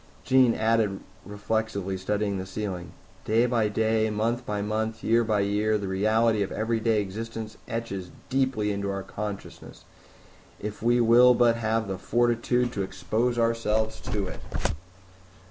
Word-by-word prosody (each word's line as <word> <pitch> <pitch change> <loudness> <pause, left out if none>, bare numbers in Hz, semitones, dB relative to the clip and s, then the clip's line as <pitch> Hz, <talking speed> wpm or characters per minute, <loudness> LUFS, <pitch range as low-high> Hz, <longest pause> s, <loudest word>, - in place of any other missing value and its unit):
Jean 130 -3 +4
added 110 -3 +1 0.3
reflectively, 105 -2 -2
studying 100 +1 -1
the 95 - -4
ceiling, 95 -3 -5 0.3
"Day 115 +3 +3
by 115 -3 +2
day, 110 +1 +1
month 115 +3 -1
by 105 0 -1
month, 110 +2 -2
year 115 +1 +3
by 110 -2 +1
year, 105 +2 +1
the 100 -2 -4
reality 110 +3 +2
of 100 - -1
everyday 110 0 +1
existence 110 +2 -5
etches 100 -6 -4 0.2
deeply 130 -6 0
into 100 0 -2
our 100 0 -3
consciousness, 105 0 -7 0.8
if 105 0 -6
we 120 +2 +3
will 120 +2 +6
but 120 -1 +4
have 110 -1 0
the 95 -1 -4
fortitude 120 +2 +1
to 100 - -2
expose 100 +6 -1
ourselves 110 -1 0
to 105 -2 -2
it." 90 - -7
110 Hz, 145 wpm, -26 LUFS, 100-115 Hz, 0.8 s, will